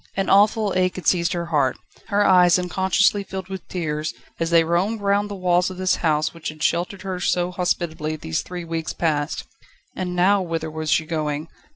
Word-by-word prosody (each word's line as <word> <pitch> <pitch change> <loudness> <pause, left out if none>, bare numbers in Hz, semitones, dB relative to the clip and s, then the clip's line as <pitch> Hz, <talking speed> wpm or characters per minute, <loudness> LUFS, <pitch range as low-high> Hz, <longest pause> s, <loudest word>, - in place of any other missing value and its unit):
An 195 - 0
awful 205 +1 +4
ache 185 -1 +1
had 185 - -7
seized 170 0 +2
her 170 -1 -2
heart; 145 -6 +1 0.3
her 205 0 +2
eyes 180 -2 +6
unconsciously 190 +2 +2
filled 190 -1 -7
with 190 -2 -7
tears, 155 -3 -3 0.2
as 165 0 0
they 170 -1 +5
roamed 180 +7 0
round 205 +1 +1
the 205 - -5
walls 180 -1 +2
of 185 - -8
this 185 0 +1
house 155 -2 +1
which 165 -1 -5
had 155 0 -8
sheltered 180 +3 -1
her 190 -2 -4
so 180 0 0
hospitably, 165 -3 -2
these 80 - -3
three 180 -1 -7
weeks 165 -1 -3
past. 150 -3 -1 0.5
And 180 -1 -3
now 190 +3 +4
whither 165 -3 -3
was 155 0 -4
she 155 +3 +2
going? 155 -1 -3
175 Hz, 195 wpm, -22 LUFS, 160-190 Hz, 0.5 s, eyes